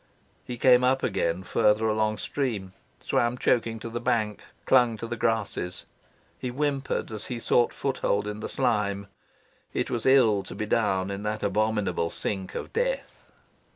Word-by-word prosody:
He 125 - -6
came 125 0 +6
up 130 +1 +2
again 85 +2 0
further 105 +2 +2
along 110 0 +1
stream, 105 -6 -3 0.3
swam 120 +1 +1
choking 115 -2 +1
to 115 - -5
the 120 +1 -3
bank, 110 -3 0 0.2
clung 125 -3 +4
to 110 - -5
the 120 +1 -3
grasses. 110 -6 -1 0.5
He - - -3
whimpered 140 -1 -1
as 110 -1 -5
he 120 -2 -4
sought 120 +1 +3
foot 135 -1 -3
hold 100 +1 +1
in 105 0 -4
the - - -5
slime. 105 -6 0 0.7
It - - -1
was 120 +1 -1
ill 120 -7 +5
to - - -9
be 105 - -3
down 100 -3 +1
in 100 0 -4
that 105 +1 -3
abominable 100 -4 0
sink 95 +1 -4
of - - -5
death. - - -2
110 Hz, 165 wpm, -27 LUFS, 105-125 Hz, 0.7 s, came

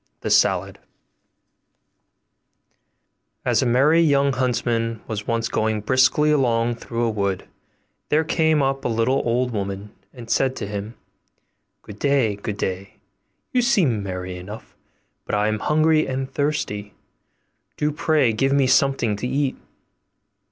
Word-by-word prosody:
THE - - -3
SALAD - - +2 2.7
As - - +2
a 130 - +1
merry 140 +7 +4
young 140 -3 +3
huntsman 115 -3 -1
was 105 -2 -5
once 115 0 0
going 110 -1 -1
briskly 130 +6 +3
along 120 -4 +1
through 115 0 -4
a 115 - +2
wood, 100 -3 -2 0.6
there 155 +2 +3
came 160 -2 +2
up 135 0 -1
a - - 0
little 115 +3 +1
old 125 +1 0
woman, 100 -1 -4 0.2
and 120 -3 -11
said 130 +3 +1
to - - -4
him, 105 +2 -6 0.9
'Good 105 0 -11
day, 135 -7 +2
good 100 0 -5
day; 95 0 -4 0.6
you 250 - +2
seem 185 - +2
merry 90 -1 -5
enough, 105 +4 -10 0.5
but - - -2
I 105 +1 +1
am 110 0 -1
hungry 155 +3 +2
and 135 0 -4
thirsty; 105 -9 -2 0.8
do 150 0 0
pray 150 -5 +2
give 135 +5 +1
me 140 -1 +3
something 130 -4 +2
to 125 - -3
eat. 135 +1 -1
120 Hz, 135 wpm, -22 LUFS, 105-140 Hz, 2.7 s, merry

